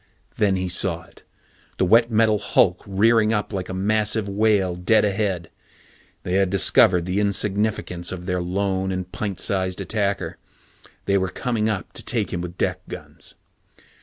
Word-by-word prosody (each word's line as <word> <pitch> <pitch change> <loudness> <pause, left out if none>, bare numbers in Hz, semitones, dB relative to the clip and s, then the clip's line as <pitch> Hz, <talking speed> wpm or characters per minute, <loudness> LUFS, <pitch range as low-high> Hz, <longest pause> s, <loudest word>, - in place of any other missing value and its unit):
Then 100 -2 +2
he 95 0 -2
saw 85 -2 0
it 85 - -20 0.6
the - - +2
wet 115 +5 +5
metal 110 -2 +3
hulk 90 -1 +2
rearing 110 +3 +3
up 105 0 -2
like 95 -2 -4
a - - -4
massive 105 +2 0
whale 100 -2 +2
dead 90 +6 +2
ahead. 100 -4 -1 0.7
They 90 - -3
had 95 0 +3
discovered 90 -1 +4
the 95 +2 -1
insignificance 100 -3 -1
of 90 -1 -6
their 90 -1 -1
lone 95 +1 -1
and 90 -1 -4
pint 100 -4 -4
sized 95 -2 0
attacker. 100 -2 -2 0.7
They 100 0 +2
were 95 0 -1
coming 110 +2 -1
up 100 -6 -4
to - - -9
take - - -1
him 85 - -2
with 90 0 -7
deck - - -1
guns. - - -8
95 Hz, 165 wpm, -23 LUFS, 90-105 Hz, 0.7 s, wet